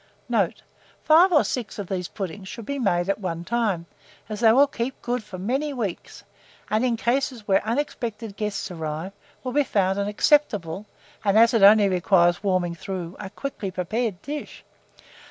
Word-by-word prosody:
Note. -, -, 0 dB, 0.4 s
Five 335 Hz, +5 st, +6 dB
or 300 Hz, -, +5 dB
six 240 Hz, -5 st, -4 dB
of 205 Hz, -, -4 dB
these 180 Hz, -1 st, -3 dB
puddings 190 Hz, 0 st, -6 dB
should 230 Hz, +2 st, -8 dB
be 280 Hz, +3 st, -3 dB
made 175 Hz, -7 st, +1 dB
at 195 Hz, -, 0 dB
one 170 Hz, -4 st, -4 dB
time, 200 Hz, -4 st, -1 dB, 0.4 s
as 210 Hz, -1 st, -4 dB
they 225 Hz, -1 st, +6 dB
will 270 Hz, +5 st, +6 dB
keep 265 Hz, -2 st, -4 dB
good 245 Hz, -1 st, -2 dB
for 210 Hz, -3 st, -9 dB
many 265 Hz, +10 st, -1 dB
weeks, 215 Hz, -9 st, -5 dB, 0.5 s
and 215 Hz, +3 st, +2 dB
in 240 Hz, -2 st, +1 dB
cases 240 Hz, -2 st, -1 dB
where 195 Hz, -1 st, +3 dB
unexpected 225 Hz, -3 st, -3 dB
guests 210 Hz, -2 st, -3 dB
arrive, 160 Hz, +2 st, -4 dB, 0.3 s
will 255 Hz, -, -3 dB
be 290 Hz, +1 st, +3 dB
found 195 Hz, -5 st, +1 dB
an 200 Hz, -, -1 dB
acceptable, 210 Hz, -, +1 dB, 0.4 s
and, 200 Hz, 0 st, +3 dB
as 230 Hz, +1 st, +6 dB
it 225 Hz, -, +3 dB
only 205 Hz, +1 st, +7 dB
requires 175 Hz, -1 st, +3 dB
warming 185 Hz, -3 st, 0 dB
through, 180 Hz, 0 st, -6 dB
a 200 Hz, -, -6 dB
quickly 210 Hz, -2 st, -5 dB
prepared 190 Hz, +2 st, -2 dB
dish. 295 Hz, +1 st, -6 dB
210 Hz, 170 wpm, -24 LUFS, 185-240 Hz, 0.5 s, only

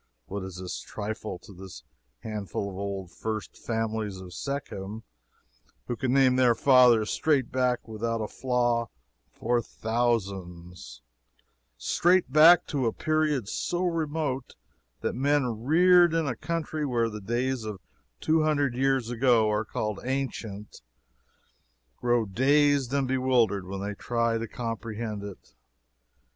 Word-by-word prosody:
What 100 Hz, +7 st, -5 dB
is 95 Hz, -1 st, -7 dB
this 90 Hz, -1 st, -5 dB
trifle 110 Hz, -2 st, -5 dB
to 95 Hz, +3 st, -15 dB
this 90 Hz, -9 st, -11 dB, 0.4 s
handful 100 Hz, -2 st, -4 dB
of -, -, -10 dB
old 95 Hz, -2 st, -5 dB
first 110 Hz, -2 st, -5 dB
families 110 Hz, -3 st, -3 dB
of 90 Hz, -1 st, -10 dB
Shechem 110 Hz, -4 st, -5 dB, 0.8 s
who 120 Hz, -, -3 dB
can 125 Hz, +2 st, -1 dB
name 130 Hz, -1 st, +4 dB
their 125 Hz, -2 st, +4 dB
fathers 125 Hz, -5 st, +5 dB
straight 145 Hz, -6 st, +1 dB
back 125 Hz, -2 st, 0 dB
without 115 Hz, +1 st, -2 dB
a 110 Hz, -, -2 dB
flaw 120 Hz, -2 st, 0 dB, 0.4 s
for 120 Hz, +1 st, 0 dB
thousands 95 Hz, -, -3 dB, 0.7 s
straight 175 Hz, -, +2 dB
back 165 Hz, +3 st, +8 dB
to 135 Hz, -6 st, -1 dB
a -, -, +1 dB
period 155 Hz, -7 st, 0 dB
so 175 Hz, -, -2 dB
remote 155 Hz, -6 st, -2 dB, 0.5 s
that -, -, -1 dB
men 130 Hz, -4 st, 0 dB
reared 175 Hz, +2 st, +5 dB
in 165 Hz, -1 st, +1 dB
a 130 Hz, -4 st, -2 dB
country 155 Hz, +1 st, -3 dB
where 120 Hz, -5 st, +1 dB
the 105 Hz, -1 st, -7 dB
days 120 Hz, +4 st, -1 dB
of 105 Hz, -3 st, -6 dB, 0.4 s
two 160 Hz, 0 st, +2 dB
hundred 145 Hz, -4 st, +1 dB
years 130 Hz, -2 st, +1 dB
ago 120 Hz, -3 st, +3 dB
are 105 Hz, +1 st, 0 dB
called 105 Hz, -1 st, -3 dB
"ancient" 120 Hz, -6 st, -4 dB
times -, -, -15 dB, 1.2 s
grow 120 Hz, -2 st, +1 dB
dazed 140 Hz, +4 st, +2 dB
and 140 Hz, -1 st, +1 dB
bewildered 125 Hz, -7 st, +1 dB
when 95 Hz, 0 st, -5 dB
they 100 Hz, +1 st, -3 dB
try 115 Hz, +1 st, -1 dB
to 115 Hz, -, -4 dB
comprehend 115 Hz, -2 st, -5 dB
it! 100 Hz, -2 st, -10 dB
120 Hz, 135 wpm, -27 LUFS, 105-135 Hz, 1.2 s, back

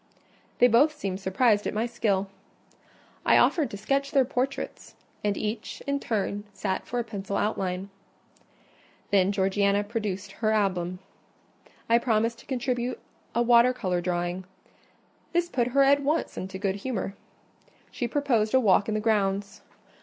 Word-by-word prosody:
They 245 Hz, -, +6 dB
both 280 Hz, +7 st, +4 dB
seemed 195 Hz, -7 st, -3 dB
surprised 205 Hz, +2 st, +2 dB
at -, -, -3 dB
my 220 Hz, +2 st, +1 dB
skill. 200 Hz, -4 st, 0 dB, 1.0 s
I -, -, +5 dB
offered 310 Hz, -5 st, +3 dB
to 200 Hz, -, -7 dB
sketch 275 Hz, +7 st, 0 dB
their 275 Hz, -3 st, +3 dB
portraits; 265 Hz, +1 st, -3 dB, 0.3 s
and 205 Hz, -1 st, 0 dB
each, 215 Hz, +2 st, -4 dB
in 280 Hz, 0 st, 0 dB
turn, 205 Hz, -4 st, -2 dB
sat 190 Hz, -2 st, -3 dB
for 245 Hz, -, -3 dB
a 240 Hz, -, +1 dB
pencil 200 Hz, -3 st, -4 dB
outline. 190 Hz, -2 st, -2 dB, 1.2 s
Then 195 Hz, -1 st, +4 dB
Georgiana 200 Hz, +1 st, +2 dB
produced 205 Hz, -3 st, -4 dB
her 215 Hz, +2 st, -1 dB
album. 185 Hz, -4 st, 0 dB, 0.9 s
I 230 Hz, +1 st, +5 dB
promised 230 Hz, -1 st, 0 dB
to -, -, -17 dB
contribute 250 Hz, -1 st, -2 dB, 0.4 s
a 235 Hz, -, +3 dB
water 240 Hz, +1 st, +5 dB
colour 185 Hz, -7 st, -1 dB
drawing: 175 Hz, +1 st, -2 dB, 0.9 s
this 345 Hz, 0 st, +1 dB
put 240 Hz, -7 st, 0 dB
her 275 Hz, +2 st, +4 dB
at 280 Hz, +1 st, +4 dB
once 300 Hz, +4 st, 0 dB
into 190 Hz, +1 st, -5 dB
good 195 Hz, 0 st, -1 dB
humour. 200 Hz, -3 st, -3 dB, 0.8 s
She 240 Hz, -, -2 dB
proposed 240 Hz, -4 st, +1 dB
a -, -, +7 dB
walk 205 Hz, -3 st, +3 dB
in 215 Hz, -, -1 dB
the -, -, +1 dB
grounds. 200 Hz, -2 st, 0 dB
215 Hz, 150 wpm, -27 LUFS, 195-245 Hz, 1.2 s, a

